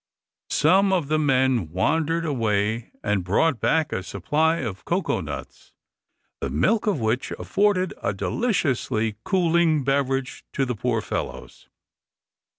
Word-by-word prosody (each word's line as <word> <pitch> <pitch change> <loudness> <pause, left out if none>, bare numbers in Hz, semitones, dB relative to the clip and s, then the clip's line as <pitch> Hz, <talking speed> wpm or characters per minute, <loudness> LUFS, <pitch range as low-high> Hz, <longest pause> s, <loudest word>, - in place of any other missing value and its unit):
Some 195 +1 +4
of 175 -7 0
the 155 0 +2
men 130 - +2
wandered 160 - 0
away, 110 -5 0
and 105 -3 0
brought 115 - +2
back 160 -2 +1
a - - -1
supply 150 - 0
of 110 - -5
cocoa 180 +3 -1
nuts, - - -8 0.7
the - - -3
milk 220 -1 +1
of 200 -9 +1
which 115 +3 -1
afforded 195 -2 +1
a - - 0
deliciously 115 - -1
cooling 170 -5 +2
beverage 135 -1 -1
to 135 - +1
the 125 - -2
poor 115 0 -1
fellows. - - -6
135 Hz, 130 wpm, -24 LUFS, 110-165 Hz, 0.7 s, Some